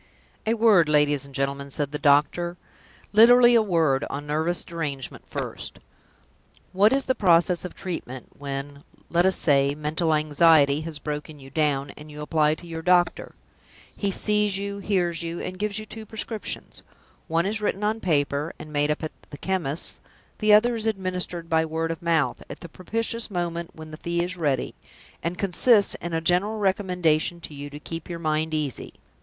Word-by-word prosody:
"A 225 - +2
word, 210 -8 +5
ladies 145 -2 +2
and 140 - -13
gentlemen," 140 0 -2
said 140 0 -2
the 150 - -4
doctor; 150 +5 +2 0.6
"literally 240 +3 +7
a 230 - +6
word, 165 -9 +1
on 145 +1 -5
nervous 160 +4 -1
derangement 145 -6 -5
first. - - -5 1.0
What 200 +4 +5
is 275 0 +1
the 260 - +2
process 175 -4 +3
of 180 - -7
treatment, 130 -9 -6
when, 140 0 -6 0.3
let 175 +2 +3
us 190 - +4
say, 140 -1 +3
mental 155 +2 0
anxiety 150 -1 +4
has 160 -1 -5
broken 150 0 -6
you 135 0 -13
down, 145 -3 0
and 150 +1 -13
you 150 0 -9
apply 150 0 +2
to 175 - -13
your 165 -1 -6
doctor? 175 0 +2 0.6
He 200 - -1
sees 210 0 +1
you, 200 0 -4
hears 180 -4 0
you, 170 0 -4
and 185 0 -6
gives 210 0 -1
you 215 - -4
two 220 0 -9
prescriptions. 220 0 -4 0.5
One 165 +1 +1
is 215 +2 -1
written 205 -1 -1
on 215 +2 0
paper, 145 -3 0
and 155 0 -10
made 145 0 +1
up 150 - -1
at 155 - -3 0.2
the 145 - -9
chemist's. 170 -3 -1 0.4
The 215 -1 +3
other 225 +4 +6
is 225 -1 -2
administered 180 -4 -3
by 160 -1 +2
word 160 +1 -2
of 165 - -6
mouth, 165 -3 +1
at - - -9
the 170 - -9
propitious 230 +6 -2
moment 170 -3 -4
when 155 -1 -10
the 155 - -8
fee 170 +1 -1
is 180 +1 -3
ready; 145 -7 -1 0.5
and 170 +2 -3
consists 200 +3 +4
in 170 -1 -5
a 165 - 0
general 180 +6 +2
recommendation 180 -5 +1
to 155 - -9
you 145 0 -7
to 145 +1 -9
keep 165 +2 -7
your 170 - -4
mind 155 -1 -1
easy. 150 -4 -4
165 Hz, 180 wpm, -25 LUFS, 150-190 Hz, 1.0 s, literally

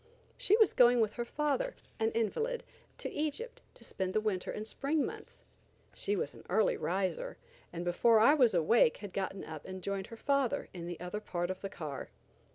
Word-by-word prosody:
She 445 -4 +4
was 440 -4 +5
going 245 0 +6
with 215 -2 +2
her 240 - -3
father, 300 - -1 0.2
an 225 0 +2
invalid, 450 - 0 0.3
to - - -4
Egypt, 310 - -3
to - - -13
spend 185 -1 -3
the - - +5
winter 210 -4 -1
and 210 - -4
spring 280 +6 0
months. - - -9 0.5
She 205 - -1
was 145 - -2
an - - -13
early 220 - +3
riser, 195 - -2 0.3
and 175 0 -5
before 220 +6 +4
I 235 +7 +7
was 250 -9 +4
awake 170 +1 +4
had 200 -3 -8
gotten 195 0 -3
up 155 -2 -7
and 185 -1 -7
joined 195 0 -2
her 230 - -10
father 275 -1 0
in 170 -2 -6
the 175 -1 -5
other 180 +4 -4
part 175 -3 -2
of 185 - -7
the 195 - -4
car. 150 -7 -6
215 Hz, 195 wpm, -33 LUFS, 185-280 Hz, 0.5 s, I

